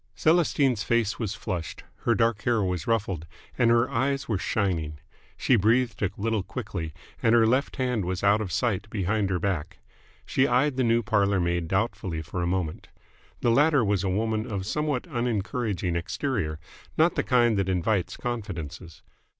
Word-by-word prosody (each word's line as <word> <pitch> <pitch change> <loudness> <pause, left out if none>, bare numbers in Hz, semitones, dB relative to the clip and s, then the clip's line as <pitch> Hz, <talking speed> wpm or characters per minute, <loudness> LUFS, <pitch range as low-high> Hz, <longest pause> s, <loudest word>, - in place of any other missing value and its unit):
Celestine's 145 -8 +2
face 115 -1 0
was 110 -3 -2
flushed, 85 -3 -5 0.2
her 115 - +4
dark 115 -3 +1
hair 115 -2 +1
was 90 -3 -2
ruffled, 95 -8 -1 0.3
and 120 - +3
her 115 +1 +4
eyes 135 +2 -1
were 110 -5 0
shining. 85 -8 -1 0.4
She 130 - +3
breathed 115 +1 +2
a 100 - +2
little 110 0 0
quickly, 95 -7 -5 0.3
and 115 +1 +4
her 115 -1 +5
left 130 +5 +1
hand 125 -5 0
was 90 +1 -3
out 100 +2 +4
of 95 -4 -4
sight 105 0 -1
behind 100 0 0
her 95 - +1
back. 90 -5 -2 0.5
She 130 - +2
eyed 130 +3 +2
the 130 - +1
new 115 0 +2
parlour 100 -3 +2
maid 85 -1 0
doubtfully 95 -4 -1
for 90 +3 -4
a 85 - 0
moment. 90 -3 -2 0.5
The 120 - +3
latter 145 -1 +4
was 100 -2 +1
a 95 - 0
woman 110 +4 -1
of 95 -2 -3
somewhat 150 +3 -1
unencouraging 115 - -2
exterior, 85 - -2 0.4
not 160 +2 +4
the - - +1
kind 120 -3 +3
that 95 -1 0
invites 95 +1 0
confidences. 90 - -6
110 Hz, 170 wpm, -26 LUFS, 95-120 Hz, 0.5 s, her